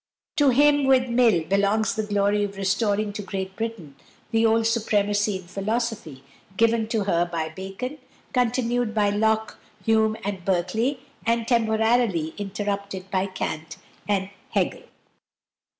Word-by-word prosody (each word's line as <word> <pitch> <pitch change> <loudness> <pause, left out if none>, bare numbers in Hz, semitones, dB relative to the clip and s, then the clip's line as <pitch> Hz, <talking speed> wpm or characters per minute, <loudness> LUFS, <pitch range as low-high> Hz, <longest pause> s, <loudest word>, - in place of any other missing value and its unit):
To 290 -2 +5
him, 290 +2 +4
with 260 -1 +4
Mill, 235 -8 +4
belongs 200 +4 +1
the 220 - -1
glory 205 0 +1
of 200 -1 -4
restoring 205 +1 0
to 210 - -4
Great 190 -1 -5
Britain 220 -11 -5 0.4
the 225 0 +3
old 225 0 +2
supremacy 210 -2 +1
in 185 - -11
philosophy 200 - -3 0.3
given 230 -1 +3
to 220 -2 0
her 175 -3 +2
by 165 -2 -3
Bacon, 195 - -6 0.3
continued 245 -2 +1
by 205 -2 +3
Locke, 220 +1 0 0.3
Hume, 220 -1 +3
and 195 -2 -4
Berkeley, 195 +9 0 0.2
but 230 0 0
temporarily 220 -7 +2
interrupted 200 -1 -4
by 190 0 +1
Kant 160 -4 -5 0.3
and 195 -1 0 0.2
Hegel. - - 0
210 Hz, 135 wpm, -24 LUFS, 195-230 Hz, 0.4 s, To